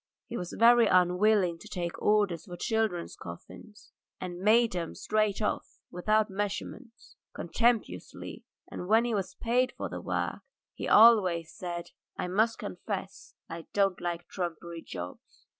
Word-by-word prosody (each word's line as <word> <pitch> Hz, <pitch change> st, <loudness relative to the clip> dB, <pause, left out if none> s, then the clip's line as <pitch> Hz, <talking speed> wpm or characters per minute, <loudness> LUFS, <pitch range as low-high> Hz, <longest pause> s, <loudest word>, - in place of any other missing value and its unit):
He 240 Hz, -, -7 dB
was 180 Hz, -5 st, -5 dB
very 235 Hz, 0 st, +6 dB
unwilling 180 Hz, 0 st, +3 dB
to 215 Hz, -, -12 dB
take 175 Hz, -5 st, -4 dB
orders 205 Hz, -5 st, +2 dB
for 175 Hz, -3 st, -8 dB
children's 220 Hz, -6 st, -1 dB
coffins, 210 Hz, -, -12 dB, 0.3 s
and 180 Hz, -1 st, -6 dB
made 225 Hz, +3 st, +4 dB
them 170 Hz, -2 st, -4 dB
straight 215 Hz, -1 st, 0 dB
off -, -, -2 dB
without 215 Hz, +4 st, +2 dB
measurements, 205 Hz, +4 st, -6 dB, 0.2 s
contemptuously, 230 Hz, +7 st, -1 dB, 0.2 s
and 180 Hz, -, -7 dB
when 225 Hz, +3 st, +4 dB
he 240 Hz, -, -1 dB
was 190 Hz, -2 st, -2 dB
paid 250 Hz, +2 st, +1 dB
for -, -, -4 dB
the -, -, -6 dB
work -, -, -2 dB, 0.3 s
he -, -, -5 dB
always 185 Hz, -8 st, +6 dB
said: 175 Hz, -1 st, -6 dB, 0.3 s
"I -, -, -2 dB
must 220 Hz, +5 st, +2 dB
confess 195 Hz, -1 st, -6 dB
I 165 Hz, 0 st, -8 dB
don't 195 Hz, -2 st, +2 dB
like 175 Hz, 0 st, -3 dB
trumpery 170 Hz, -2 st, -5 dB
jobs." 90 Hz, -, -9 dB
195 Hz, 140 wpm, -29 LUFS, 175-220 Hz, 0.3 s, very